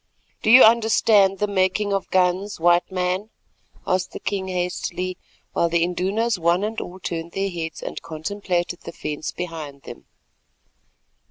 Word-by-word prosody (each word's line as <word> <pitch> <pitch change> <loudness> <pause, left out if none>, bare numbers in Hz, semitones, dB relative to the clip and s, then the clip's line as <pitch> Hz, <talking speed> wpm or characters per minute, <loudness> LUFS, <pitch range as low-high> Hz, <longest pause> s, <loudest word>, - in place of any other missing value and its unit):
"Do - - 0
you 250 +3 +10
understand 220 -3 +5
the 210 - +1
making 200 +1 +1
of 195 - -2
guns, 185 +2 +1
White 175 +2 +3
Man?" 185 +3 -1 0.6
asked 185 0 -1
the - - -6
king 195 -2 -3
hastily, 180 0 -3 0.4
while 170 - +2
the 165 0 +2
Indunas 195 +5 0
one 170 +3 +2
and 220 +1 -2
all 185 +2 -8
turned 170 -1 -5
their 195 0 -1
heads, 165 -2 -5
and - - -5
contemplated 175 +2 -3
the 170 - -9
fence 150 -1 -4
behind 155 -6 -7
them. - - -11
185 Hz, 150 wpm, -23 LUFS, 170-200 Hz, 0.6 s, you